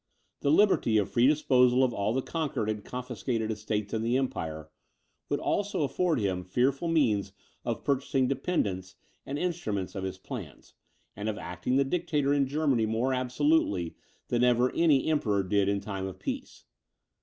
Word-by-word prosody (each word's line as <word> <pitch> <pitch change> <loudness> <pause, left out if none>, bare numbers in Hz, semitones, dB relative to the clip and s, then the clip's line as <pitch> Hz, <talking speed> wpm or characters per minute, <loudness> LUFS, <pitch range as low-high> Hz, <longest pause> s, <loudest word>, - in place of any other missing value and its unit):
The 140 - 0
liberty 155 - +4
of 105 - 0
free 120 +1 +4
disposal 130 -4 +4
of 125 -2 +1
all 100 +1 0
the 130 +2 0
conquered 145 -10 -2
and 105 -1 -5
confiscated 120 -2 -3
estates 105 -1 -3
in 110 - 0
the 120 +3 +1
empire, 80 - -3 0.6
would - - 0
also 205 -6 0
afford 165 +2 +1
him 95 -3 -1
fearful 130 - 0
means 110 -12 +1 0.3
of - - -3
purchasing 135 -1 +1
dependents 100 - -1 0.3
and 140 - -3
instruments 145 - -2
of 95 -3 -5
his 95 0 -4
plans, - - -9 0.4
and 105 +2 -3
of 105 - -3
acting 90 +8 -3
the 140 - +4
dictator 150 -3 0
in 140 -2 +2
Germany 135 -6 +1
more 115 +4 0
absolutely 130 - +1 0.3
than 120 0 +2
ever 125 0 +3
any 150 -6 +3
Emperor 110 -11 +1
did 100 +1 +1
in 100 0 +1
time 95 -1 -4
of 95 - -8
peace. - - -6
125 Hz, 165 wpm, -29 LUFS, 100-140 Hz, 0.6 s, liberty